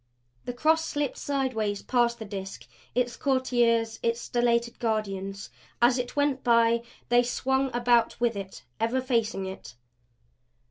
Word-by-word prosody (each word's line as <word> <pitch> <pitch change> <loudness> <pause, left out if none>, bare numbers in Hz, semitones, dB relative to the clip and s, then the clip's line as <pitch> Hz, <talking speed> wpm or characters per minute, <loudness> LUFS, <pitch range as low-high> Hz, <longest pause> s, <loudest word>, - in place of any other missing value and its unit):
The 245 - -3
Cross 320 +5 +2
slipped 290 -3 -2
sidewise 245 -8 -1
past 240 -2 +2
the 220 - -7
Disk, 195 -2 -7 0.3
its 245 -1 0
courtiers, 240 -4 +1
its 230 0 0
stellated 235 0 0
guardians. 200 -4 -3 0.3
As 245 +2 +4
it 245 0 -4
went 285 -2 +1
by 230 -1 +4 0.3
they 240 0 +5
swung 265 +2 0
about 240 -1 +2
with 235 -2 +1
it; 195 -1 -7 0.2
ever 230 +4 +1
facing 230 -6 0
it. 120 -12 -8
235 Hz, 135 wpm, -27 LUFS, 225-255 Hz, 0.3 s, they